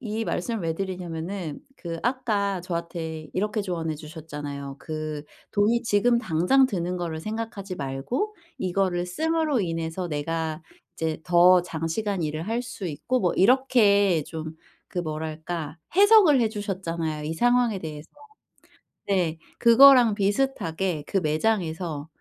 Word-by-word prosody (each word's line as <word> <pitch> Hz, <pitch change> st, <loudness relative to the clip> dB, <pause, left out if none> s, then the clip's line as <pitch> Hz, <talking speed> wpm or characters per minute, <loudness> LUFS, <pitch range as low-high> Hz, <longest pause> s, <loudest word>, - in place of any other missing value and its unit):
이 225 Hz, -2 st, -3 dB
말씀을 230 Hz, -4 st, -2 dB
왜 165 Hz, -1 st, -1 dB
드리냐면은 180 Hz, -2 st, -5 dB, 0.2 s
그 170 Hz, -2 st, -6 dB
아까 210 Hz, -7 st, 0 dB
저한테 170 Hz, -2 st, -5 dB
이렇게 210 Hz, +2 st, -1 dB
조언해 165 Hz, -4 st, -3 dB
주셨잖아요. 145 Hz, -3 st, -7 dB
'그 155 Hz, -2 st, -5 dB, 0.3 s
돈이 220 Hz, +3 st, +2 dB
지금 235 Hz, +2 st, +3 dB
당장 185 Hz, +8 st, +3 dB
드는 180 Hz, -4 st, -2 dB
거를 165 Hz, -2 st, -4 dB
생각하지 215 Hz, -1 st, -5 dB
말고 145 Hz, -, -3 dB, 0.2 s
이거를 180 Hz, -1 st, 0 dB
씀으로 315 Hz, -, 0 dB
인해서 165 Hz, 0 st, -3 dB
내가 160 Hz, +1 st, -3 dB, 0.4 s
이제 160 Hz, -1 st, -1 dB
더 180 Hz, 0 st, +6 dB
장시간 175 Hz, +3 st, -2 dB
일을 155 Hz, +3 st, -3 dB
할 235 Hz, +2 st, 0 dB
수 225 Hz, -6 st, -6 dB
있고' 235 Hz, -, -1 dB
뭐 180 Hz, -, +2 dB
이렇게 205 Hz, -, +4 dB
좀 160 Hz, -1 st, -7 dB, 0.3 s
그 180 Hz, -, -2 dB
뭐랄까 155 Hz, 0 st, -5 dB, 0.2 s
해석을 400 Hz, -, +7 dB
해 225 Hz, -, +3 dB
주셨잖아요, 170 Hz, -7 st, -3 dB
이 160 Hz, +2 st, -3 dB
상황에 245 Hz, 0 st, +2 dB
대해서. 155 Hz, -1 st, -8 dB, 1.0 s
네. 180 Hz, -5 st, +1 dB, 0.2 s
그거랑 240 Hz, -2 st, +7 dB
비슷하게 195 Hz, -, -1 dB
그 195 Hz, -, 0 dB
매장에서 160 Hz, -2 st, -1 dB
180 Hz, 285 characters per minute, -25 LUFS, 160-220 Hz, 1.0 s, 해석을